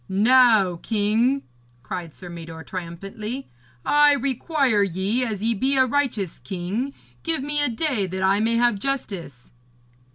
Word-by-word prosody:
'Now, 215 -3 +5
king,' 225 +7 +1 0.4
cried 170 -1 -6
Sir 180 - -10
Mador 165 -1 -8
triumphantly, 195 +9 -6 0.4
'I 295 0 +5
require 270 -3 +1
ye, 200 +6 0
as 215 -4 -3
ye 230 +1 +2
be 265 +6 +1
a 260 - +5
righteous 240 - -1
king, 190 - -4 0.3
give 325 -5 0
me 295 +1 +1
a 290 - +2
day 240 -5 0
that 190 +1 -4
I 195 +2 +3
may 225 +2 +2
have 240 -3 +2
justice.' 195 - -4
220 Hz, 140 wpm, -23 LUFS, 190-265 Hz, 0.4 s, Now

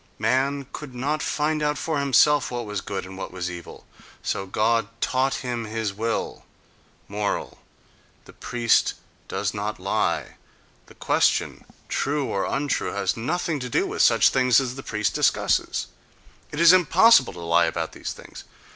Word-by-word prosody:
Man 140 +2 0
could 140 -4 -8
not 145 +5 -1
find 155 +1 -1
out 150 0 0
for 155 -3 -2
himself 140 +2 +4
what 120 -1 -4
was 105 -2 -4
good 95 -2 -5
and 95 +1 -10
what - - -6
was 90 -1 -4
evil, 85 -1 -10 0.4
so 95 - -2
God 115 +3 +1
taught 130 +2 +1
him 120 -2 -3
His 110 -2 -3
will.... 115 +3 -3 0.6
Moral: 105 0 -3 0.7
the - - -15
priest 120 -2 +1 0.3
does - - -2
not 105 0 -4
lie—the 100 +2 -4
question, - - +1 0.2
"true" 145 0 -1
or 100 -5 -1
"untrue," 145 -2 -1
has 100 -2 -1
nothing 160 +5 -2
to 125 -1 -5
do - - +1
with - - -2
such - - +5
things 125 -1 +4
as 130 -2 -3
the 135 - -8
priest 105 -5 -2
discusses; - - +1 0.7
it 145 - -5
is 170 +1 +8
impossible 185 - +5
to 90 - -10
lie 85 0 +3
about - - -3
these - - -6
things. - - -11
125 Hz, 155 wpm, -24 LUFS, 105-145 Hz, 0.7 s, is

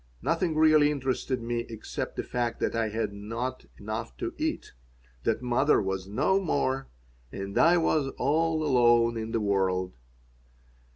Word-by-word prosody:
Nothing 165 -1 0
really 155 -1 +5
interested 130 -3 -2
me 120 0 -1
except 110 -2 -5
the - - -3
fact 120 -1 -2
that - - -1
I 115 -1 0
had 105 -1 -2
not 115 +5 -5
enough 110 +2 -5
to 355 -2 -4
eat, 315 -1 -3 0.5
that - - 0
mother 125 +4 +3
was 95 -1 -3
no 145 - +2
more, 135 -7 -1 0.4
that 100 +5 -6
I 175 +1 +5
was 155 -4 +1
all 155 +3 +1
alone 120 -3 +4
in 110 0 -4
the 115 - 0
world. 95 -3 0
120 Hz, 150 wpm, -28 LUFS, 110-150 Hz, 0.5 s, really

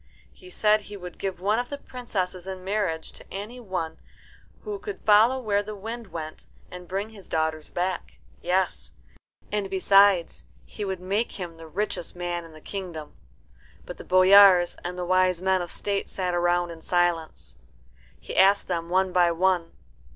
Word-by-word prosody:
He 370 - -15
said 215 -9 +3
he 205 0 -9
would 180 -2 -10
give 190 -2 -3
one 205 +5 +1
of 245 - -3
the 285 - -4
princesses 190 -9 -4
in 190 -1 -6
marriage 190 -5 -2
to - - -14
any 210 +6 -6
one 180 -8 -4 0.6
who 415 -1 -5
could 415 0 -6
follow 220 +5 +5
where 205 -4 +1
the 210 +1 -7
wind 225 +3 -6
went 155 -3 -8 0.2
and 180 0 -9
bring 195 +4 -3
his 205 -3 -14
daughters 160 -1 -1
back; 180 0 -3 0.3
yes, 185 +1 -1 0.6
and 205 -2 -1
besides, 195 -2 +4 0.2
he 210 - -7
would 190 -2 -3
make 200 +5 -1
him 175 -3 -6
the 165 0 -11
richest 180 0 -3
man 175 -1 -3
in 165 - -13
the 155 - -14
kingdom. 175 -6 -7 0.7
But - - -8
the - - -9
boyars 185 -1 +7
and 180 +1 -5
the 180 - -3
wise 185 -1 +3
men 190 0 +1
of 175 - -5
state 200 +3 -3
sat 185 -2 -2
round 175 0 +1
in 165 -1 -10
silence. 175 -2 -1 0.6
He - - -8
asked 195 +1 +5
them 170 -2 -2
one 185 +1 +2
by 175 -1 +4
one. 175 0 +1
185 Hz, 175 wpm, -26 LUFS, 175-205 Hz, 0.7 s, boyars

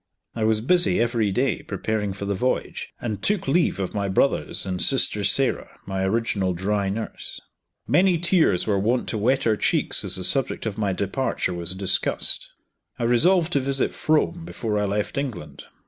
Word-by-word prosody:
I 110 -2 -1
was 110 -1 +2
busy 175 +8 +2
every 115 -3 0
day 125 +5 0
preparing 105 -2 -3
for 100 +1 -6
the 100 - -1
voyage, 125 +7 -2
and 110 -4 -4
took 205 -7 0
leave 160 - +1
of 95 -2 -3
my 100 -1 -2
brothers 115 +8 0
and 90 -2 -3
sister - - +3
Sarah, - - +1
my 95 -1 -3
original 95 -3 -1
dry 100 +2 -1
nurse. 110 +3 -6 0.5
Many 180 -1 +3
tears 170 - +3
were 100 -3 0
wont 120 +5 0
to 110 - -2
wet 130 +6 +1
our 110 -2 +2
cheeks - - +1
as - - -2
the 95 - -2
subject 135 +5 0
of 110 -3 -3
my 105 -2 -1
departure 100 +5 -2
was 85 +1 -4
discussed. 95 -1 +1 0.5
I - - -4
resolved 165 +9 +3
to 140 - +3
visit 135 0 0
Frome 160 +2 0
before 110 -10 -3
I 105 - 0
left 105 +6 -2
England. 90 - -7
110 Hz, 180 wpm, -23 LUFS, 100-135 Hz, 0.5 s, sister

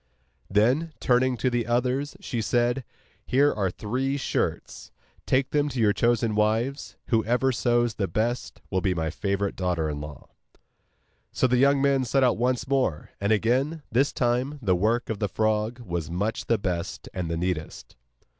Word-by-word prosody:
Then, 125 +11 +2
turning 125 0 +2
to 130 +2 0
the 120 -1 -1
others, 125 +4 0
she 120 - -3
said: 120 +3 +1 0.4
'Here 140 +3 +3
are 100 -3 0
three 130 +9 -2
shirts; 140 - -3 0.4
take 130 0 +2
them 145 0 +1
to 130 -3 -4
your 105 -2 +4
chosen 115 -1 +1
wives. 110 +6 0
Whoever 120 +3 +2
sews 120 -1 +1
the 100 -2 -2
best 115 +7 -2
will 95 -1 +1
be 90 0 +1
my 80 -1 -1
favourite 100 +2 -2
daughter 90 -4 -1
in 75 0 -5
law.' 75 -1 -10 1.0
So - - +1
the 125 0 +3
young 140 +1 +4
men 140 -1 +3
set 135 +2 +2
out 125 -3 +3
once 125 +1 0
more; 130 - 0
and 100 +2 +1
again, 130 +9 +1
this 135 +5 +2
time, 125 +4 0
the 95 -8 +2
work 110 +6 0
of 105 - -4
the 105 - -1
frog 110 +3 0
was 85 -7 -4
much 100 +6 -2
the 115 - +3
best 90 -4 -4
and 90 -3 -3
the 85 - -2
neatest. 85 -2 -4
120 Hz, 170 wpm, -26 LUFS, 100-130 Hz, 1.0 s, your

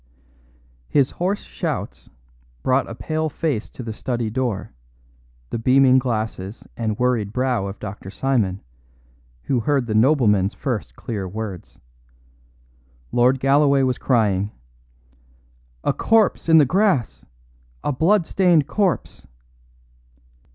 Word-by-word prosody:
His 140 -3 +2
hoarse 190 +4 -2
shouts - - -5 0.5
brought 130 +1 +1
a 115 - -6
pale 155 +4 -2
face 145 -7 -2
to 125 - -9
the 115 -1 -5
study 120 -1 -3
door, 120 -5 -2 0.8
the - - -2
beaming 130 +2 +5
glasses 110 -5 -4
and 110 -3 -2
worried 120 -5 0
brow 125 -4 0
of 100 +1 -7
Dr. 95 -1 -8
Simon, 105 -5 -1 0.8
who 130 - 0
heard 135 +2 +1
the 110 - -3
nobleman's 110 -5 +3
first 125 -6 -4
clear 105 -6 -5
words. 100 -2 -7 1.3
Lord 125 +2 +3
Galloway 140 0 +3
was 130 -2 0
crying: 105 -6 +1 1.3
"A - - +1
corpse 220 -6 +2
in 160 - +7
the 150 - +7
grass 185 - +1 0.6
a - - 0
blood 170 +7 +2
stained 175 -6 +3
corpse." 195 +1 -1
125 Hz, 115 wpm, -22 LUFS, 110-145 Hz, 1.3 s, in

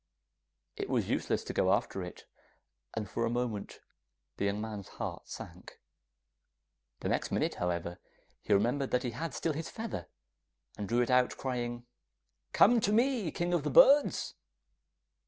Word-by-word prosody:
It - - -3
was - - 0
useless - - 0
to - - -5
go 95 - +3
after 100 -1 0
it, 90 -1 -8 0.7
and 110 -2 -2
for 115 - -2
a 115 - +1
moment 120 -4 -3 0.6
the 100 - 0
young 100 +1 0
man's 105 -3 -5
heart - - -6
sank. - - -9 1.2
The - - -2
next - - 0
minute, - - +1
however, 85 0 -2 0.4
he - - -5
remembered 120 +7 +2
that 125 +1 +1
he 125 - -2
had 160 +8 -4
still 165 - -1
his 160 +2 -4
feather, 220 - -5 0.7
and 105 -2 -5
drew 120 +1 +3
it 120 - -2
out 125 0 +3
crying, 120 -2 -3 0.7
'Come 235 +3 +6
to 205 - +1
me, 235 -4 +2
King 175 +3 -2
of 175 - +2
the 150 - -2
Birds! 280 - +6
120 Hz, 155 wpm, -32 LUFS, 105-165 Hz, 1.2 s, Come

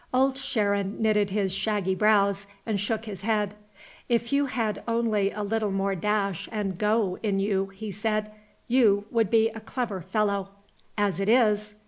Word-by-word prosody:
Old 265 +1 +3
Sharon 205 -6 -1
knitted 210 -2 +2
his 195 -2 0
shaggy 195 -1 0
brows 200 0 +2 0.2
and 215 -3 -1
shook 220 +2 -1
his 200 -4 -7
head. 210 -1 0 0.6
"If 235 +2 +1
you 285 0 +3
had 225 -5 -2
only 225 -4 +1
a 210 - -4
little 215 +1 0
more 195 0 0
dash 200 -1 -1
and 205 -4 -2
go 210 -1 +1
in 200 -3 0
you," 195 -1 0
he 200 +2 -7
said, 215 +1 -1 0.4
"you 215 -5 +4
would 225 -4 +2
be 225 0 +4
a 225 0 -8
clever 220 -3 -4
fellow. 200 +1 -1 0.5
As 200 -4 +1
it 195 +1 0
is 210 -3 +3
210 Hz, 165 wpm, -26 LUFS, 195-225 Hz, 0.6 s, you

